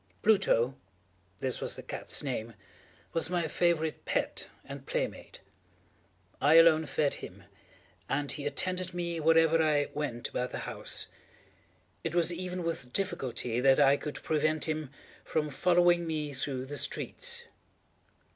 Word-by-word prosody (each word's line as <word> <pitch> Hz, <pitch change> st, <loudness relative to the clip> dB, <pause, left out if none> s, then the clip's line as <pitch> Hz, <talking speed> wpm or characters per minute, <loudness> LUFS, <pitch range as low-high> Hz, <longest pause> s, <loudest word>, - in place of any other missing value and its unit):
Pluto—this 95 Hz, -, 0 dB
was -, -, 0 dB
the -, -, -8 dB
cat's -, -, -1 dB
name—was 115 Hz, -, -5 dB
my 175 Hz, -2 st, 0 dB
favorite 160 Hz, -1 st, 0 dB
pet -, -, -1 dB, 0.2 s
and -, -, -9 dB
playmate. -, -, -4 dB, 1.0 s
I 150 Hz, +3 st, +5 dB
alone 160 Hz, -1 st, +7 dB
fed 140 Hz, +1 st, +1 dB
him, -, -, -10 dB, 0.7 s
and 140 Hz, +1 st, 0 dB
he 145 Hz, -1 st, -3 dB
attended 185 Hz, +5 st, -1 dB
me 170 Hz, -1 st, -2 dB
wherever 165 Hz, +1 st, +4 dB
I 150 Hz, -2 st, +2 dB
went 140 Hz, -6 st, -3 dB
about 125 Hz, 0 st, -2 dB
the -, -, -5 dB
house. -, -, -3 dB, 1.0 s
It 165 Hz, +1 st, -3 dB
was 175 Hz, 0 st, +3 dB
even 180 Hz, 0 st, -4 dB
with 165 Hz, -7 st, -4 dB
difficulty 130 Hz, -, -1 dB
that 135 Hz, +2 st, +5 dB
I 140 Hz, -1 st, +6 dB
could 150 Hz, +1 st, -6 dB
prevent 155 Hz, 0 st, +1 dB
him 155 Hz, -3 st, -2 dB, 0.3 s
from 150 Hz, -2 st, -1 dB
following 175 Hz, +2 st, +3 dB
me 150 Hz, -2 st, -2 dB
through 130 Hz, -1 st, -3 dB
the 145 Hz, +2 st, -5 dB
streets. 475 Hz, -1 st, -1 dB
155 Hz, 130 wpm, -30 LUFS, 135-170 Hz, 1.0 s, alone